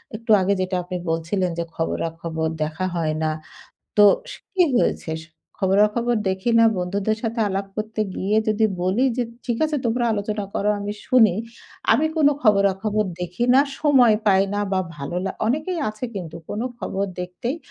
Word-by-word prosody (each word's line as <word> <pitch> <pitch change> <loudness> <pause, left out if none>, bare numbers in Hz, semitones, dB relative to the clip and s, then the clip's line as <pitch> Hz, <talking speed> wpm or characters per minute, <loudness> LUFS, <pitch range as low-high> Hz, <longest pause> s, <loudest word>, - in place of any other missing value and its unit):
একটু 225 +1 -3
আগে 190 +2 +2
যেটা 185 0 -1
আপনি 180 +1 -4
বলছিলেন 170 +3 0
যে - - 0
খবরাখবর 165 0 -2
দেখা 155 +4 -3
হয় 160 -2 0
না। 155 - +1 0.7
তো 210 - +7 0.3
স - - -7 0.2
কি 375 -2 +4
হয়েছে? 160 -8 0 0.5
খবরাখবর 210 +5 +2
দেখি 190 +5 -1
না। 230 - +7
বন্ধুদের 200 +4 -1
সাথে 230 0 -2
আলাপ 195 0 -2
করতে 215 0 -3
গিয়ে 200 +3 0
যদি 215 +1 +2 0.2
বলি 190 +8 +2
যে, 250 - +1 0.2
"ঠিক 235 -2 -1
আছে 310 -1 0
তোমরা 240 +1 0
আলোচনা 210 0 -2
করো 205 - 0
আমি 205 0 -3
শুনি। 225 -8 +5 0.6
আমি 315 - +3
কোন 300 -2 +5
খবরাখবর 205 0 +2
দেখি 180 +6 -2
না, 270 - +7 0.2
সময় 260 -7 +5
পাই 195 -1 +5
না 205 - 0
বা 190 - +2 0.2
ভালো 145 +4 -5
লা" 195 - -2
অনেকেই 310 +9 -1
আছে 215 +3 -6
কিন্তু 170 -4 -6
কোন 210 - -3 0.2
খবর 195 -4 -2 0.2
দেখতেই 180 - -4
205 Hz, 165 wpm, -22 LUFS, 180-230 Hz, 0.7 s, তো